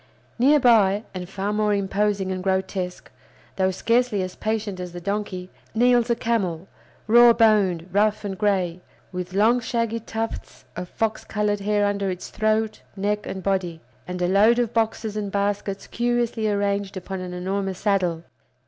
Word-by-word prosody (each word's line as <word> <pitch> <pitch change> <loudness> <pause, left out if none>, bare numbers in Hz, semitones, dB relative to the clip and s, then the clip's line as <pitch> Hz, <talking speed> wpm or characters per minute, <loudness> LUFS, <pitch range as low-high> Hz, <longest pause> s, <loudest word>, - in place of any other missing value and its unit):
Near 290 +5 +5
by, 215 -5 +4
and 180 -1 -6
far 200 +1 -2
more 210 -1 +2
imposing 200 0 0
and 185 -1 -3
grotesque, 190 -1 -2 0.5
though 190 -1 +2
scarcely 230 +1 +1
as 185 0 -6
patient 215 -3 -2
as 180 -1 -6
the 175 - -6
donkey, 190 -1 -4 0.2
kneels 245 0 +4
a 235 - +3
camel, 195 -7 -1 0.4
raw 235 +2 +7
boned, 200 -7 +3
rough, 210 +2 +1
and 195 -1 -3
gray, 185 -4 0 0.3
with 180 -1 -5
long 225 +5 +4
shaggy 230 -1 -1
tufts 225 0 -5
of 180 0 -6
fox 220 -1 -2
colored 210 -1 -1
hair 205 +1 +1
under 200 -1 0
its 180 -1 -5
throat, 215 0 0
neck, 205 +1 -1
and 190 -1 -5
body, 185 -4 -1 0.3
and 180 0 -3
a - - +2
load 210 +5 +5
of 240 -2 0
boxes 220 -1 -1
and 205 -2 -3
baskets 200 0 -2
curiously 240 -2 0
arranged 200 -1 -1
upon 190 +1 -5
an 180 -1 -6
enormous 190 +1 -2
saddle. 185 -6 0
205 Hz, 160 wpm, -24 LUFS, 190-220 Hz, 0.5 s, raw